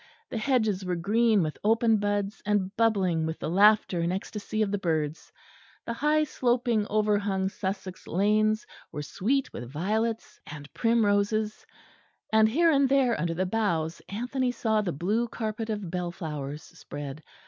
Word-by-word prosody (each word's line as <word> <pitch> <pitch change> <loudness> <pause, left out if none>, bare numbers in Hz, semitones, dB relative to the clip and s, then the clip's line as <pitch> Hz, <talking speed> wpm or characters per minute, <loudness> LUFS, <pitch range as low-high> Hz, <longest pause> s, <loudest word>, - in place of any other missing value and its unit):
The - - -2
hedges 220 -6 +1
were 180 -1 -1
green 210 +3 +3
with 155 -1 -4
open 225 +1 +3
buds, 205 0 -1
and 205 -1 0
bubbling 190 -8 +2
with 160 - -4
the 155 - -4
laughter 205 -1 +4
and 170 +1 0
ecstasy 210 +3 -2
of 200 - -2
the 205 - -1
birds; 160 -4 -2 0.5
the 235 - -3
high 300 +5 +2
sloping 240 -6 0
overhung 205 -2 +1
Sussex 190 -2 -5
lanes 215 +4 +2 0.3
were 150 - -5
sweet 255 - -1
with 120 0 -7
violets 215 - -2
and 150 -2 -10
primroses; 215 -2 +1 0.7
and 220 0 +6
here 330 +7 +4
and 275 -2 +3
there 265 -4 +3
under 165 0 -1
the 185 +3 0
boughs 175 -6 -1
Anthony 250 +4 -1
saw 220 -3 +1
the 190 -4 -2
blue 205 +10 0
carpet 220 -1 -4
of 205 -5 -3
bell 180 -1 -2
flowers 150 -4 -6
spread. 145 0 -8
205 Hz, 155 wpm, -27 LUFS, 180-225 Hz, 0.7 s, and